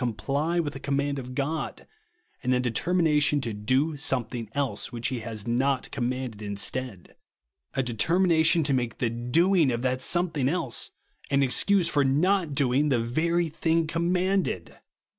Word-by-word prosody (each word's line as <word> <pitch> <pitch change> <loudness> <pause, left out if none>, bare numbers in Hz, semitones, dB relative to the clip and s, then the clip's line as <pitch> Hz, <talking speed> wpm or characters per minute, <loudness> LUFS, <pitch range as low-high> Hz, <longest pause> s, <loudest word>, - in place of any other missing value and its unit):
91 120 -3 -1
comply 155 +5 -1
with 150 -4 -2
a - - -6
ccmmand 140 0 -1
of 125 0 -8
God, 150 +3 -3 0.6
and 125 - 0
a - - +2
de 125 -1 -1
teimination 150 0 +2
to 115 -5 -3
do 130 +10 +1
somiething 125 -6 -2
else, 140 -3 -2
which 120 -1 -2
he 130 - -3
has 110 -2 -6
not 130 +2 0
commanded, 125 -3 -3
instead; 105 0 -4 0.6
a 135 - +1
determina 160 - +2
tion 160 +1 +4
to 140 -1 0
make 120 -3 -1
the 120 -2 0
doinsr 155 +7 +2
of 120 +1 -2
that 130 0 0
somethino 160 -3 0
else 165 -6 -2 0.4
an 140 0 +3
excuse 180 +7 +2
for 145 -3 +2
not 160 +3 +2
doing 140 +1 +2
the 130 - +3
very 165 +9 0
thing 160 +1 0
commanded 175 - 0
140 Hz, 160 wpm, -26 LUFS, 125-160 Hz, 0.6 s, tion